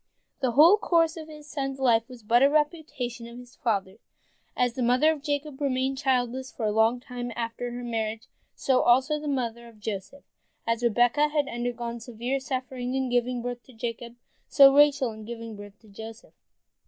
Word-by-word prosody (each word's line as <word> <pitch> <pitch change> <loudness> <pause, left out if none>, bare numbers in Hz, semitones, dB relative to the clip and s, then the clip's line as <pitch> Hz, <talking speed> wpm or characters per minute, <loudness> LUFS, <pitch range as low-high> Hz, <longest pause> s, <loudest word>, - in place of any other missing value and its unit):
The 255 -4 0
whole 330 - +7
course 330 -2 +2
of 315 -2 -8
the 305 -1 -11
son's 275 -2 -4
life 235 -3 +2
is 250 -3 -12
but 235 +3 +3
a 275 - +6
repetition 295 -6 -2
of 235 +1 -11
the 250 - -10 0.2
father's. 200 -3 -1 0.6
As 245 -1 +2
the 255 - -4
mother 250 +6 +4
of 310 -3 -4
Jacob 290 -1 -3
remained 265 -1 0
childless 260 -1 0
for 225 - -4
a 210 - +1
long 220 +3 +3
time 245 -1 -6
after 235 +1 -4
her 245 +1 -6
marriage, 225 -1 -3 0.3
so 260 -2 +2
also 260 +5 +3
the 300 - -6
mother 235 -4 -2
of 225 -2 -17
Joseph. 210 +6 -6 0.4
As 230 0 0
Rebekah 245 +5 +3
had 295 -2 0
undergone 240 -1 -4
severe 240 +3 -3
suffering 255 -1 -4
in 265 -1 -1
giving 245 0 0
birth 245 0 -4
to 260 - -15
Jacob, 235 0 -6 0.3
so 275 -1 +8
Rachel 285 -3 +4
in 220 0 -10
giving 230 0 -7
birth 205 0 -11
to 220 - -20
Joseph. 220 +2 -11
245 Hz, 185 wpm, -27 LUFS, 230-275 Hz, 0.6 s, so